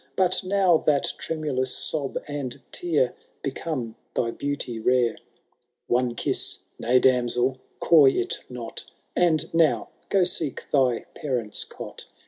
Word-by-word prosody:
But 185 0 +2
now 185 -3 +4
that 145 -2 +2
tremulous 140 -5 -2
sob 145 -4 0
and 145 -4 -4
tear 150 -8 +1 0.3
Become 135 -5 -3 0.2
thy 115 - +1
beauty 140 -4 -3
rare. 120 0 +2 0.7
One 120 0 +1
Tn'wB - - 0 0.2
nay, 125 +2 +3
damsel, 125 0 +2 0.2
coy 150 -5 +7
it 125 - -1
not 125 -2 -6 0.2
!— - - -44
And 160 -1 0
now 165 -2 +3 0.2
go 195 -2 +4
seek 160 -5 0
thy 130 -4 +2
parents* 125 -7 -1
cot. - - -10
135 Hz, 125 wpm, -25 LUFS, 125-160 Hz, 0.7 s, coy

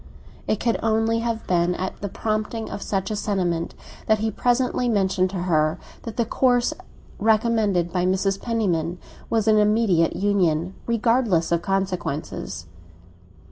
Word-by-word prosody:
It 215 - 0
could 230 -1 0
only 225 +1 +1
have 230 -1 -2
been 175 0 +1
at 185 +1 -5
the 200 - -3
prompting 215 +2 -3
of 200 - -5
such 195 +1 -2
a - - -1
sentiment 180 -5 -1 0.3
that 220 - +4
he 220 +1 -1
presently 245 +2 +1
mentioned 190 -3 +2
to 185 -2 -3
her 155 -2 +2 0.2
that 225 -2 -8
the 235 - +2
course 245 +1 +2 0.5
recommended 215 -5 +2
by 180 0 +1
Mrs. 195 +1 0
Penniman 180 -8 -1 0.3
was 225 -1 +1
an 215 -1 +5
immediate 210 -6 +3
union, 185 -4 +1
regardless 230 -7 +2
of 170 -1 +2
consequences. 180 - -3
205 Hz, 140 wpm, -23 LUFS, 180-225 Hz, 0.5 s, an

